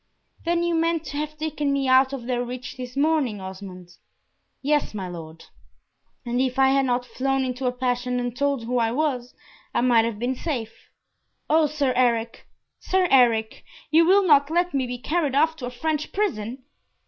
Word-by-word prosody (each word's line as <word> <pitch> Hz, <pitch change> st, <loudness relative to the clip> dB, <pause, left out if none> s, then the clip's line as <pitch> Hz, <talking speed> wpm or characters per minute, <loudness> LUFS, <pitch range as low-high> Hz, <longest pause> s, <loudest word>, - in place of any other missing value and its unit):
"Then 340 Hz, 0 st, +1 dB
you 345 Hz, 0 st, 0 dB
meant 330 Hz, 0 st, +1 dB
to 285 Hz, +1 st, -6 dB
have 305 Hz, +1 st, -4 dB
taken 300 Hz, -2 st, -2 dB
me 275 Hz, -1 st, 0 dB
out 260 Hz, +1 st, +5 dB
of 265 Hz, -4 st, -6 dB
their 245 Hz, -1 st, -1 dB
reach 250 Hz, +1 st, -7 dB
this 250 Hz, 0 st, -8 dB
morning, 285 Hz, -8 st, +1 dB
Osmond?" 185 Hz, -2 st, -9 dB, 0.7 s
"Yes, 295 Hz, -5 st, +1 dB
my 190 Hz, -3 st, -4 dB
Lord." 165 Hz, -2 st, -9 dB, 0.8 s
"And 245 Hz, +1 st, 0 dB
if 260 Hz, -1 st, -1 dB
I 265 Hz, 0 st, +5 dB
had 270 Hz, 0 st, +2 dB
not 245 Hz, 0 st, 0 dB
flown 270 Hz, +1 st, -1 dB
into 255 Hz, 0 st, -3 dB
a -, -, +2 dB
passion 250 Hz, 0 st, -1 dB
and 245 Hz, -1 st, -3 dB
told 280 Hz, -2 st, 0 dB
who 245 Hz, +2 st, -1 dB
I 225 Hz, -1 st, +1 dB
was, 255 Hz, -3 st, -2 dB, 0.4 s
I -, -, +3 dB
might 240 Hz, -2 st, +4 dB
have 230 Hz, -2 st, -3 dB
been 245 Hz, +4 st, -1 dB
safe! 245 Hz, -6 st, -5 dB, 0.6 s
O 315 Hz, 0 st, +4 dB
Sir 285 Hz, -3 st, 0 dB
Eric! 235 Hz, -2 st, 0 dB, 0.3 s
Sir 375 Hz, -1 st, +1 dB
Eric! 235 Hz, -2 st, +3 dB, 0.3 s
you 325 Hz, +2 st, +6 dB
will 385 Hz, +3 st, +4 dB
not 285 Hz, -4 st, +5 dB
let 350 Hz, +1 st, +1 dB
me 265 Hz, -2 st, 0 dB
be 245 Hz, 0 st, -4 dB
carried 295 Hz, +1 st, -1 dB
off 315 Hz, +3 st, +3 dB
to 250 Hz, -, -5 dB
a -, -, -3 dB
French 305 Hz, +4 st, -3 dB
prison!" 255 Hz, -, -2 dB
260 Hz, 185 wpm, -24 LUFS, 245-300 Hz, 0.8 s, you